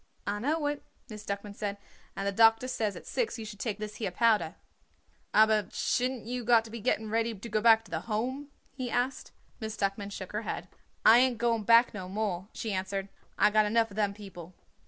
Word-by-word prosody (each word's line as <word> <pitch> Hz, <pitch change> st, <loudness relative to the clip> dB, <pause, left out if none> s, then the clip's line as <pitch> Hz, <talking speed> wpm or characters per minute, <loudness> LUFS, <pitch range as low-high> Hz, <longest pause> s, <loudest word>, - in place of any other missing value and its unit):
"I 205 Hz, +1 st, -2 dB
know 295 Hz, +6 st, 0 dB
it," 290 Hz, 0 st, -1 dB, 0.3 s
Miss 210 Hz, -1 st, -8 dB
Duckman 200 Hz, +1 st, -5 dB
said; 205 Hz, -1 st, -3 dB, 0.4 s
"and 195 Hz, -, -3 dB
the 200 Hz, -, +1 dB
doctor 225 Hz, +3 st, +5 dB
says 220 Hz, -5 st, -1 dB
at -, -, -10 dB
six 475 Hz, -, -2 dB
you 225 Hz, -, -6 dB
should 210 Hz, -2 st, -9 dB
take 210 Hz, -3 st, -2 dB
this 215 Hz, 0 st, -6 dB
here 215 Hz, -, -2 dB
powder." 205 Hz, -4 st, +2 dB, 0.8 s
"Aber 215 Hz, -1 st, +4 dB
shouldn't 250 Hz, -2 st, -1 dB
you 245 Hz, +1 st, -3 dB
got 230 Hz, -1 st, +4 dB
to 225 Hz, -, -11 dB
be 230 Hz, -, -6 dB
getting 220 Hz, -1 st, -1 dB
ready 225 Hz, 0 st, 0 dB
to 210 Hz, +4 st, -9 dB
go 215 Hz, -1 st, 0 dB
back 225 Hz, 0 st, +6 dB
to -, -, -17 dB
the -, -, -1 dB
Home?" 255 Hz, +6 st, -3 dB, 0.2 s
he 255 Hz, -2 st, -4 dB
asked. 245 Hz, +3 st, -1 dB, 0.3 s
Miss 220 Hz, -2 st, -5 dB
Duckman 200 Hz, 0 st, -1 dB
shook 190 Hz, -2 st, -7 dB
her 210 Hz, -, -2 dB
head. -, -, -5 dB, 0.4 s
"I 230 Hz, +2 st, +9 dB
ain't 255 Hz, -2 st, +3 dB
going 230 Hz, -2 st, 0 dB
back 230 Hz, +3 st, +6 dB
no 185 Hz, -3 st, -6 dB
more," 195 Hz, -2 st, -2 dB
she 220 Hz, -3 st, -4 dB
answered. 195 Hz, +1 st, -3 dB, 0.3 s
"I 210 Hz, -, +5 dB
got 215 Hz, 0 st, +4 dB
enough 225 Hz, 0 st, +2 dB
of -, -, -10 dB
them 205 Hz, -2 st, 0 dB
people." 185 Hz, -4 st, -11 dB
220 Hz, 215 wpm, -29 LUFS, 205-235 Hz, 0.8 s, I